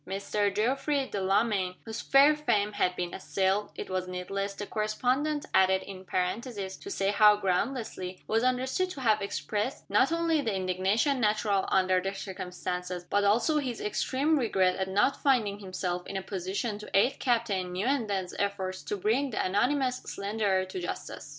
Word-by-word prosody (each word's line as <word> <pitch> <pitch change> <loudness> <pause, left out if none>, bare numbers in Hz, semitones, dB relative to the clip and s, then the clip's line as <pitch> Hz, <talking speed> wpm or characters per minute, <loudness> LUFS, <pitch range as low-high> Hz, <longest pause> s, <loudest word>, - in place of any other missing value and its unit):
Mr. 200 +2 -1
Geoffrey 270 +5 +1
Delamayn, 195 -1 +1
whose 225 -1 -5
fair 280 +2 +6
fame 210 -9 +1
had 185 -3 0
been 175 -1 -3
assailed 195 +2 0
(it - - -6
was 185 -1 -2
needless, 195 +2 -4
the 205 - -5
correspondent 255 +9 0
added 190 0 +4
in 190 -1 -9
parenthesis, 190 +2 -3
to 395 - -9
say 195 - 0
how 210 0 +6
groundlessly), 195 -1 -2
was 225 +2 +1
understood 260 +8 +1
to 330 - -7
have 220 -4 +2
expressed, 210 +5 -3
not 270 - +4
only 335 -2 +2
the 225 - -1
indignation 190 +9 +1
natural 210 -3 +1
under 185 -1 +3
the 190 +1 -2
circumstances 180 -2 -5
but 205 0 +3
also 235 +10 +3
his 255 -5 -3
extreme 280 +8 +1
regret 190 -6 +2
at 190 - -2
not 205 +8 +1
finding 220 -8 +2
himself 185 -2 -4
in 195 - -4
a 190 - -4
position 200 +3 -3
to 210 - -9
aid 260 +7 +3
Captain 225 -7 0
Newenden's 200 -2 -1
efforts 190 -2 -2
to 205 - -4
bring 235 +8 +1
the 225 - -1
anonymous 250 +7 +1
slanderer 200 -3 -1
to 185 0 -6
justice. 175 -4 -6
205 Hz, 165 wpm, -29 LUFS, 190-250 Hz, -, fair